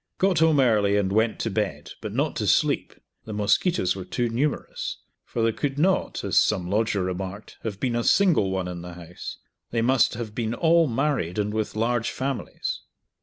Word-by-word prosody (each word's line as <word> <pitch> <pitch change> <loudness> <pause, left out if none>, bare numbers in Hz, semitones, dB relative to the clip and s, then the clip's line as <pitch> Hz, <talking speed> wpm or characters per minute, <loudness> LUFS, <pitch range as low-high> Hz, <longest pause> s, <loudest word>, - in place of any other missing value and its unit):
Got 190 -4 +2
home 160 -2 +4
early 105 -5 +3
and 95 -2 +1
went 110 +2 +2
to 115 - -1
bed, 105 0 -2
but - - -5
not - - 0
to - - -1
sleep, - - +2 0.3
the 110 - -6
mosquitoes 105 - +2
were 95 - -5
too 120 +5 -1
numerous, 135 +6 -2 0.3
for 115 - -3
there 115 - +3
could 140 +4 -3
not 185 +5 +1
(as - - +3
some 90 -2 +1
lodger 105 -2 +1
remarked) 95 +3 -5
have 100 -3 -5
been 125 -3 0
a 120 - 0
single 175 - +4
one 95 -1 -2
in 90 -1 -6
the 90 0 -8
house; 90 0 -8 0.3
they 115 -1 0
must 130 0 +3
have 110 -2 -5
been 115 0 -2
all 165 +3 +4
married 130 - -1
and 105 0 0
with 110 -1 -2
large 115 +1 0
families. 135 0 -3
115 Hz, 190 wpm, -25 LUFS, 100-130 Hz, 0.3 s, home